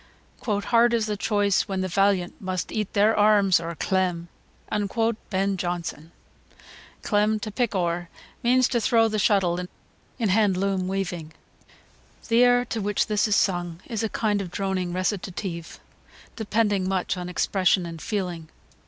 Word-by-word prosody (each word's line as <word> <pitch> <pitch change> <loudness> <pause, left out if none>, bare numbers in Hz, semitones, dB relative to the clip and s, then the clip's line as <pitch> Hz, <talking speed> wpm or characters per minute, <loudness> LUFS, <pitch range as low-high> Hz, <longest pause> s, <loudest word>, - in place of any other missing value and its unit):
"Hard 230 +3 +2
is 225 -2 0
the 210 -1 -2
choice, 205 -1 +1
when 190 -1 -2
the 185 - -1
valiant 190 -1 +1
must 185 -1 -3
eat 210 -3 -3
their 210 +2 +4
arms 205 -4 +4
or 170 0 -5
clem." 175 -1 -1 0.4
Ben 205 -1 -1 0.7
Jonson.] 170 -3 -4 0.9
[Footnote 210 0 +2
6: 215 - -5
To 215 - -4
"pick 235 -1 -1
ower," 175 -1 -1 0.3
means 250 +1 +3
to 235 - 0
throw 225 -1 +3
the 215 -1 -1
shuttle 190 -4 +2 0.6
in 225 -5 0
hand 200 -1 +3
loom 190 -1 0
weaving.] 180 -5 -3 1.0
The 235 +1 +5
air 245 0 +4
to 230 -2 -3
which 205 0 0
this 210 0 +1
is 210 - +2
sung 175 -3 0
is 225 -4 -3
a 225 - -1
kind 210 -2 0
of 185 - -6
droning 185 -1 -2
recitative, 185 -2 -4 0.6
depending 205 -4 0
much 190 0 -1
on 180 -1 -5
expression 185 0 +1
and 165 -1 -8
feeling. 180 -6 -4
195 Hz, 155 wpm, -25 LUFS, 180-215 Hz, 1.0 s, The